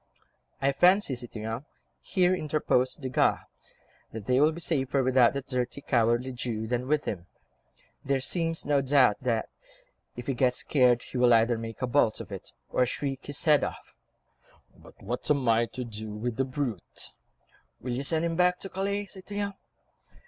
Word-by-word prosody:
"I 140 Hz, -, +4 dB
fancy, 180 Hz, +2 st, +4 dB
citoyen," 115 Hz, -1 st, -5 dB, 0.4 s
here 180 Hz, -1 st, +2 dB
interposed 150 Hz, -5 st, 0 dB
Desgas, 130 Hz, -1 st, +2 dB, 0.7 s
"that 110 Hz, -2 st, -7 dB
they 125 Hz, +2 st, +3 dB
will 155 Hz, +2 st, +5 dB
be 165 Hz, -, -7 dB
safer 135 Hz, -5 st, 0 dB
without 130 Hz, -1 st, +4 dB
that 140 Hz, -1 st, -3 dB
dirty, 125 Hz, +1 st, -2 dB
cowardly 120 Hz, -1 st, +1 dB
Jew 120 Hz, -3 st, -3 dB
than 120 Hz, +2 st, -2 dB
with 150 Hz, +1 st, +1 dB
him. 90 Hz, -3 st, -4 dB, 0.8 s
There 140 Hz, -1 st, +1 dB
seems 165 Hz, +4 st, -1 dB
no 145 Hz, -1 st, +3 dB
doubt 135 Hz, -5 st, +4 dB
that, 115 Hz, -3 st, 0 dB, 0.7 s
if 120 Hz, -, -7 dB
he 135 Hz, -, 0 dB
gets 125 Hz, 0 st, +2 dB
scared, 125 Hz, -4 st, +3 dB
he 125 Hz, -, -5 dB
will 120 Hz, -1 st, +6 dB
either 115 Hz, +1 st, +3 dB
make 115 Hz, +2 st, -6 dB
a -, -, +4 dB
bolt 120 Hz, -3 st, +2 dB
of -, -, -8 dB
it, -, -, -7 dB, 0.2 s
or 125 Hz, -, +3 dB
shriek 135 Hz, +1 st, -4 dB
his 145 Hz, -1 st, -2 dB
head 150 Hz, -3 st, +5 dB
off." -, -, -6 dB, 0.8 s
"But -, -, -17 dB
what 120 Hz, +5 st, -4 dB
am 140 Hz, -4 st, +2 dB
I 115 Hz, +1 st, +4 dB
to 125 Hz, -, -6 dB
do 110 Hz, -2 st, -6 dB
with 110 Hz, +2 st, -3 dB
the 135 Hz, -, +1 dB
brute?" 130 Hz, -, -4 dB, 0.7 s
"Will 125 Hz, 0 st, -4 dB
you 130 Hz, +3 st, -2 dB
send 160 Hz, +3 st, 0 dB
him 165 Hz, -1 st, -1 dB
back 180 Hz, +1 st, +3 dB
to 195 Hz, -, -5 dB
Calais, 200 Hz, +2 st, -2 dB
citoyen?" 200 Hz, +1 st, -5 dB
130 Hz, 170 wpm, -28 LUFS, 120-150 Hz, 0.8 s, will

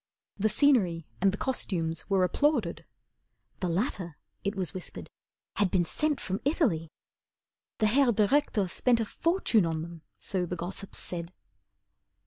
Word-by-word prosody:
The 215 Hz, +2 st, +1 dB
scenery 210 Hz, -, +3 dB, 0.2 s
and 195 Hz, 0 st, +4 dB
the 200 Hz, -, -4 dB
costumes 170 Hz, -11 st, -1 dB
were 195 Hz, -2 st, +3 dB
applauded, 230 Hz, -, +1 dB, 0.7 s
The 180 Hz, -, -1 dB
latter 180 Hz, -, -2 dB, 0.3 s
it 200 Hz, +1 st, -1 dB
was 185 Hz, -4 st, -2 dB
whispered 185 Hz, -, -7 dB, 0.5 s
had 200 Hz, -3 st, +3 dB
been 175 Hz, -1 st, +2 dB
sent 300 Hz, -, 0 dB
From 190 Hz, +1 st, -3 dB
Italy. 235 Hz, -, +1 dB, 0.9 s
The 215 Hz, -, +2 dB
Herr 250 Hz, +4 st, +4 dB
Direktor 215 Hz, -1 st, +2 dB
spent 235 Hz, +6 st, +2 dB
A 225 Hz, -, 0 dB
fortune 330 Hz, -, +2 dB
on 160 Hz, -1 st, -2 dB
them, 170 Hz, -1 st, -9 dB, 0.2 s
so 185 Hz, -3 st, -1 dB
the 180 Hz, -, -3 dB
gossips 180 Hz, +3 st, -4 dB
said. 170 Hz, -1 st, -4 dB
195 Hz, 140 wpm, -29 LUFS, 175-240 Hz, 0.9 s, and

